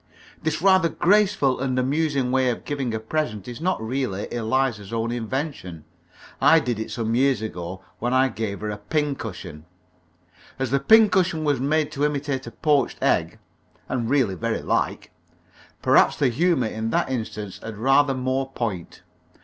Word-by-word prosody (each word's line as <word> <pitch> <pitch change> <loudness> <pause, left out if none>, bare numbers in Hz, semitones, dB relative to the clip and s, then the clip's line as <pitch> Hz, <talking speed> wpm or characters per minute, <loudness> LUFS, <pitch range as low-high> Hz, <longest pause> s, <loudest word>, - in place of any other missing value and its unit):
This 155 +1 -2
rather 190 -3 +5
graceful 185 -9 +2
and 130 -1 -1
amusing 140 0 0
way 130 -1 +2
of 120 - -4
giving 140 -5 -2
a 110 - -2
present 110 -4 -3
is 120 +2 -7
not 185 +2 0
really 110 -3 -3
Eliza's 115 -3 -1
own 115 0 -1
invention. 120 - -4 0.6
I 145 +4 +6
did 125 -6 -2
it 110 - -4
some 115 -1 -2
years 130 -2 +2
ago 95 -2 -6 0.2
when 120 +2 -1
I 130 +1 +3
gave 105 -3 -4
her 105 0 -3
a 105 - -5
pincushion. 105 - -4 0.9
As 130 -2 -2
the 140 - +3
pincushion 190 -5 +4
was 145 -4 +1
made 150 +2 +1
to 145 - -3
imitate 140 -3 -1
a - - -7
poached 145 +2 +1
egg - - +1 0.5
(and 120 -3 -2
really 130 -8 +2
very 90 - -2
like), - - -1 0.7
perhaps - - +5
the 140 -3 +2
humour 160 +1 +1
in 110 0 -3
that 130 - 0
instance 110 -5 -5
had 110 -2 -7
rather 135 +4 +3
more 130 +1 -1
point. 105 -10 -5
130 Hz, 160 wpm, -23 LUFS, 110-145 Hz, 0.9 s, I